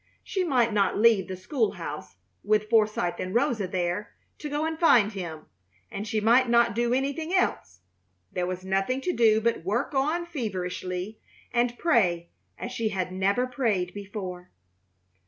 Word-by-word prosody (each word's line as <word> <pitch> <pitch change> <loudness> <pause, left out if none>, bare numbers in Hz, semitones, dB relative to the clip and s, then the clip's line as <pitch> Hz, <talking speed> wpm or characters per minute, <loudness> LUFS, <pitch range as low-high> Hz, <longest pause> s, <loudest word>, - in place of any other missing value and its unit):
She 380 - -1
might 245 -9 +2
not 200 -2 +2
leave 215 -4 +4
the 185 - -5
school 215 +4 -1
house, - - -7 0.3
with 215 +1 +1
Forsythe 210 -6 +2
and 185 +2 -4
Rosa 225 -4 +1
there, 180 +3 -3 0.2
to 300 - -5
go 295 +2 -1
and 320 0 -3
find 235 -11 +5
him, 170 -6 -6 0.5
and 205 +2 -5
she 220 0 0
might 235 +4 +4
not 235 0 +4
do 235 +2 0
anything 280 +6 -1
else. 95 - 0 0.5
There 180 0 -2
was 185 0 -5
nothing 195 +8 0
to 360 +5 -1
do 220 -5 +4
but 230 -6 0
work 230 - -1
on 305 +6 0
feverishly 185 - -4 0.3
and 240 0 +1
pray 175 - +1 0.3
as 245 - -6
she 230 -3 -1
had 185 -3 -3
never 195 +6 +1
prayed 225 -8 -1
before. 190 -3 -7
215 Hz, 160 wpm, -27 LUFS, 185-250 Hz, 0.5 s, find